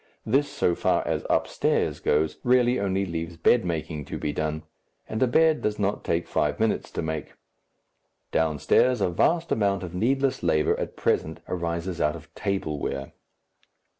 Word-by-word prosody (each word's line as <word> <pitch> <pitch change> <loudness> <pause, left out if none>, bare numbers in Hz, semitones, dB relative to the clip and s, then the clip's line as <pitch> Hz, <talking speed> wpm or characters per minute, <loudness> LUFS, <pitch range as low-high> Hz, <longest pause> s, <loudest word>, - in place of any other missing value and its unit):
This, 140 +6 +2
so 90 - +1
far - - +1
as - - -1
"upstairs" - - +1
goes, 75 +1 +1
really 125 0 +3
only 100 0 0
leaves 85 -1 -5
bedmaking 80 - +1
to - - -4
be 75 - -2
done, 80 0 -2 0.4
and 110 - -4
a 130 - +5
bed 160 +5 +3
does 105 0 -1
not 100 0 -1
take 85 +1 -1
five 75 -1 0
minutes 110 0 0
to - - -2
make. 80 -1 -4 1.0
Downstairs 80 - +2
a 95 - +2
vast 165 - +1
amount 100 -3 +1
of 90 -1 -6
needless 130 +7 +1
labour 80 -3 +2
at - - -4
present 80 +1 0
arises 85 0 -3
out 75 +1 +2
of 80 0 -13
table 95 -7 -2
wear. 70 -1 -4
90 Hz, 160 wpm, -26 LUFS, 80-110 Hz, 1.0 s, a